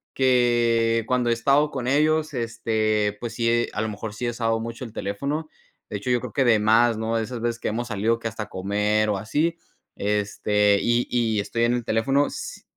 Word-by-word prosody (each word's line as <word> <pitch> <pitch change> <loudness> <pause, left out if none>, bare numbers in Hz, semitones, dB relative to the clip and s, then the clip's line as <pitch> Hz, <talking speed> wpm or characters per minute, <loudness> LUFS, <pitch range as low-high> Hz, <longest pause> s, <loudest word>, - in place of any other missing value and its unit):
que 120 -3 +3
cuando 125 -1 +1
he 115 - +4
estado 140 +5 +2
con 125 -3 -4
ellos, 155 +2 +2
este, 110 -3 0
pues 120 0 -5
sí, 120 0 +1
a - - -2
lo 110 - -2
mejor 105 0 -6
sí 125 - -4
he - - +1
usado 115 -1 -1
mucho 115 +2 -6
el 110 - -11
teléfono. 140 +11 -3 0.4
De 105 - -3
hecho, 100 +5 -5
yo 125 - +3
creo 120 -2 -8
que 135 - +2
demás, 115 +1 +4
¿no?, 110 +1 -2
de 115 - 0
esas 120 0 -6
veces 120 0 -2
que - - -3
hemos 120 +3 -3
salido 110 +2 +1
que 115 - -4
hasta 110 -2 -6
comer 105 +3 0
o 100 - 0
así, 150 - 0 0.4
este, 105 0 +1
y 120 +1 +1
y 115 -3 +1
estoy 115 +3 -1
en 120 - +2
el 120 -2 -2
teléfono, 135 +6 +2
s - - -7
115 Hz, 205 wpm, -24 LUFS, 110-125 Hz, 0.4 s, he